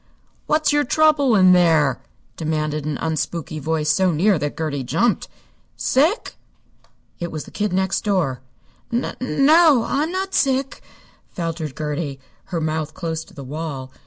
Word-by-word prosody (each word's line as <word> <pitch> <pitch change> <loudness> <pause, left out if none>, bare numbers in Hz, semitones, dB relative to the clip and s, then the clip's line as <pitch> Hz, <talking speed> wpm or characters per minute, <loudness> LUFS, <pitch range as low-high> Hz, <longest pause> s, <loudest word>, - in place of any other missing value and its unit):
"What's 305 -1 +2
your 295 0 +3
trouble 290 -3 +3
in 185 -2 +6
there?" 160 -7 +3 0.3
demanded 155 -2 -2
an 150 -2 -2
unspooky 160 0 -3
voice 155 0 0
so 185 +1 +2
near 180 +3 +2
that 145 0 -3
Gertie 150 -4 -2
jumped. 220 - 0 0.5
"Sick?" 315 - +1 0.8
It 170 0 -4
was 155 -2 -5
the - - -14
Kid 210 -2 -2
Next 190 +1 0
Door. 180 -12 0 0.5
"N 240 +2 -2
no, 280 0 +4
I'm 300 +4 0
not 380 +1 -3
sick," 270 0 0 0.5
faltered 165 -5 -4
Gertie, 150 -2 -3 0.3
her 175 -3 -3
mouth 155 -1 -2
close 165 -3 -3
to 190 - -19
the 140 - -8
wall. 140 -2 -6
170 Hz, 145 wpm, -21 LUFS, 155-250 Hz, 0.8 s, in